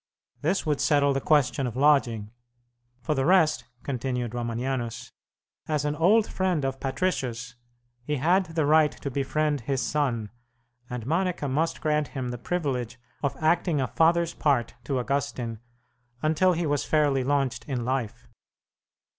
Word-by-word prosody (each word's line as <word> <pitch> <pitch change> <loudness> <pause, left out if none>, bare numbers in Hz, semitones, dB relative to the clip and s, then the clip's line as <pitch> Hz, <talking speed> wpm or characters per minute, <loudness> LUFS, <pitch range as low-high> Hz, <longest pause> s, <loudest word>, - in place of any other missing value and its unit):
This 195 - 0
would 150 -2 0
settle 145 -2 +3
the 135 - -1
question 135 -4 +2
of 120 - -5
lodging. 125 -7 +2 0.7
For 120 - 0
the 135 -2 0
rest, 155 -7 +3 0.2
continued 125 -3 -3
Romanianus, 120 0 -3 0.6
as 150 -2 0
an 150 0 0
old 200 +8 +4
friend 180 -7 -1
of 135 0 -2
Patricius 130 -5 -2 0.5
he 150 +4 -1
had 175 +7 +3
the 160 -2 -1
right 155 0 +5
to 140 - -6
befriend 145 +2 0
his 135 +3 -1
son, 125 -6 -1 0.6
and 125 -2 -5
Monica 170 +1 0
must 155 +5 -1
grant 150 -1 +1
him 130 -3 -4
the 120 -1 -5
privilege 125 -6 -2 0.2
of 140 -2 -1
acting 160 0 +2
a 130 - +1
father's 170 +1 +2
part 140 -6 +1
to 135 - -1
Augustine 125 -3 -2 0.6
until 160 +4 +3
he 170 0 -1
was 145 -2 0
fairly 145 -4 +2
launched 135 -1 0
in 125 -5 -3
life. 130 -4 -3
140 Hz, 145 wpm, -26 LUFS, 125-155 Hz, 0.7 s, right